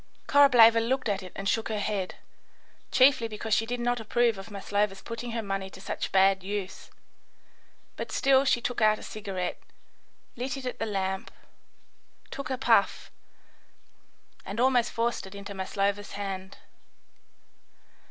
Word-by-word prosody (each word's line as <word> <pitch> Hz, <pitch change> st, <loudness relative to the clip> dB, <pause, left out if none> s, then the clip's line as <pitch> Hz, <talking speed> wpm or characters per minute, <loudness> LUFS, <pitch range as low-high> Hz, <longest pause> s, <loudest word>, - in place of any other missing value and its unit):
Korableva 245 Hz, -5 st, +7 dB
looked 255 Hz, +2 st, 0 dB
at 200 Hz, -1 st, -1 dB
it 185 Hz, -, -10 dB
and 195 Hz, -, -4 dB
shook 225 Hz, +2 st, 0 dB
her 215 Hz, -, -2 dB
head, 205 Hz, -2 st, -2 dB, 0.8 s
chiefly 255 Hz, -3 st, +5 dB
because 220 Hz, 0 st, -1 dB
see 225 Hz, -, -1 dB
did 245 Hz, +1 st, -3 dB
not 245 Hz, 0 st, 0 dB
approve 230 Hz, -1 st, +1 dB
of 195 Hz, -, -9 dB
Maslova's 200 Hz, -1 st, -2 dB
putting 235 Hz, +1 st, -6 dB
her 230 Hz, -1 st, -2 dB
money 195 Hz, -1 st, -3 dB
to 190 Hz, -, -13 dB
such 195 Hz, -, -4 dB
bad 190 Hz, 0 st, +4 dB
use; 195 Hz, -1 st, -5 dB, 1.1 s
but -, -, -5 dB
still 270 Hz, -1 st, +4 dB
she 260 Hz, -3 st, +2 dB
took 245 Hz, 0 st, -3 dB
out 215 Hz, 0 st, +4 dB
a -, -, -11 dB
cigarette, 195 Hz, -4 st, -5 dB, 0.7 s
lit 260 Hz, +3 st, -3 dB
it 265 Hz, -, -8 dB
at 250 Hz, -, -4 dB
the 225 Hz, -, -2 dB
lamp, 190 Hz, -2 st, -2 dB, 1.0 s
took 275 Hz, +2 st, -6 dB
a 260 Hz, -, -1 dB
puff, 265 Hz, -, +2 dB, 1.3 s
and 200 Hz, +3 st, -6 dB
almost 245 Hz, -2 st, +3 dB
forced 230 Hz, -3 st, -1 dB
it 190 Hz, -, -11 dB
into 200 Hz, 0 st, -7 dB
Maslova's 200 Hz, +1 st, -2 dB
hand. 195 Hz, -1 st, -5 dB
215 Hz, 150 wpm, -28 LUFS, 195-240 Hz, 1.3 s, Korableva